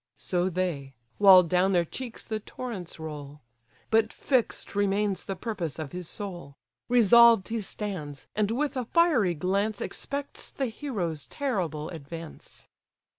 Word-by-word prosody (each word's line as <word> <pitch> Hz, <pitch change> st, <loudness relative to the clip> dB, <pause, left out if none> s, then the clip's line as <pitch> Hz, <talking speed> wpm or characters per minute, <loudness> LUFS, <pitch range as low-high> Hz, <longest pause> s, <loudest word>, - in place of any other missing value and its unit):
So 180 Hz, 0 st, 0 dB
they, 165 Hz, -7 st, -3 dB, 0.2 s
while 190 Hz, -3 st, +9 dB
down 180 Hz, +3 st, +2 dB
their 175 Hz, -1 st, +3 dB
cheeks 245 Hz, +7 st, -7 dB
the 220 Hz, -1 st, -3 dB
torrents 205 Hz, -7 st, -7 dB
roll; 150 Hz, -2 st, -7 dB, 0.5 s
But 220 Hz, 0 st, +3 dB
fix'd 255 Hz, -5 st, -1 dB
remains 200 Hz, -1 st, +1 dB
the 195 Hz, -, -3 dB
purpose 180 Hz, -, -4 dB
of 155 Hz, -3 st, -5 dB
his 180 Hz, -2 st, -6 dB
soul; 175 Hz, -8 st, -7 dB, 0.3 s
Resolved 235 Hz, -3 st, +6 dB
he 225 Hz, -1 st, -1 dB
stands, 180 Hz, -9 st, -5 dB
and 210 Hz, -1 st, +1 dB
with 275 Hz, +4 st, -1 dB
a 255 Hz, -2 st, -2 dB
fiery 255 Hz, -, +3 dB
glance 200 Hz, +6 st, 0 dB
Expects 280 Hz, 0 st, -5 dB
the 270 Hz, -, -2 dB
hero's 195 Hz, -, -4 dB
terrible 175 Hz, -, -2 dB
advance. 165 Hz, 0 st, -9 dB
195 Hz, 135 wpm, -28 LUFS, 165-225 Hz, 0.5 s, while